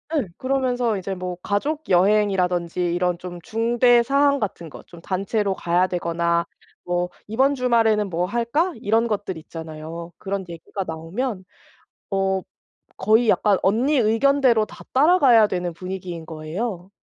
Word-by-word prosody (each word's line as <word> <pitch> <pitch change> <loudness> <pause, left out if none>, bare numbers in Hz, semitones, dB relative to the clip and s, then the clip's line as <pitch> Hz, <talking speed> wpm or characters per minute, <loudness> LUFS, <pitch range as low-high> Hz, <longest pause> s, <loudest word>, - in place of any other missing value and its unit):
예. 275 -8 +1
그러면서 250 -4 0
이제 190 +1 -4
뭐 180 0 -5
가족 295 +10 -2
여행이라든지 180 -2 +2 0.2
이런 180 -1 0
좀 175 -1 -8
중대 235 +4 +3
사항 280 +2 +3
같은 170 -6 -4
거 - - -11
좀 170 -1 -13
단체로 195 +2 -1
가야 175 +2 +1
되거나 170 -1 0 0.4
뭐 175 0 -1 0.2
"이번 265 +6 +2
주말에는 225 -5 +2
뭐 175 +1 -1
할까?" 240 - 0
이런 225 +3 +2
것들 205 -5 -3
있잖아요. 160 +1 -8
그런 195 -1 -4
얘기가 170 +3 -6
나오면 185 +7 -4 0.7
어 190 -1 0 0.6
거의 220 +1 +3
약간 205 -3 +3
언니 250 +9 +2
의견대로 235 0 +3
다 - - -13
따라가야 265 - +5
되는 180 -2 -2
분위기인 180 -2 -6
거예요. 175 +5 -5
200 Hz, 305 characters per minute, -22 LUFS, 175-235 Hz, 0.7 s, 따라가야